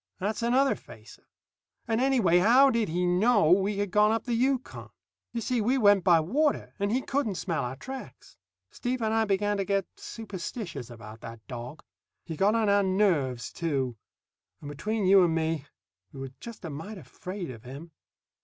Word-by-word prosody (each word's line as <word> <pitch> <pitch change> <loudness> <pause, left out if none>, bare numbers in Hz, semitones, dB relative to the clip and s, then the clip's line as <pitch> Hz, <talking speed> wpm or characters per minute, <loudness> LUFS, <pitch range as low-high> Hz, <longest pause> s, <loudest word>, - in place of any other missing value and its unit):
That's 210 +4 -2
another 260 +4 +3
facer. - - -14 0.6
And 225 +1 +1
anyway, 235 -11 +4
how 250 +8 +6
did 230 -6 0
he 175 +3 0
know 190 0 +3
we 195 +2 +3
had 205 -2 -2
gone 210 +1 +4
up 225 0 0
the 245 - -2
Yukon? 260 +2 -1 0.4
You 235 - -3
see, 245 +1 0
we 250 +5 +2
went 205 -5 +5
by 175 -3 +5
water, 275 - 0
and 200 +1 0
he 255 +3 0
couldn't 265 -8 -1
smell 170 -3 -2
our 125 +1 -4
tracks. 260 - -10 0.4
Steve 250 -1 -3
and 220 0 +1
I 225 0 +2
began 205 0 0
to 195 - 0
get 195 -1 0
superstitious 185 - -7
about 110 -1 -11
that 115 -1 -10
dog. 125 +5 -8 0.4
He 165 - -5
got 200 +7 +2
on 225 -2 +2
our 200 0 +4
nerves, 175 - +1
too; 135 -7 -2 0.6
and, 145 - -8
between 210 +8 -2
you 190 0 +7
and 165 -2 +2
me, 160 -2 -1 0.5
we 140 - -10
were 135 -1 -6
just 235 -5 -9
a 160 - -5
mite 195 +9 -7
afraid 180 +3 -7
of 115 -3 -11
him. 140 +7 -10
195 Hz, 180 wpm, -28 LUFS, 160-225 Hz, 0.6 s, you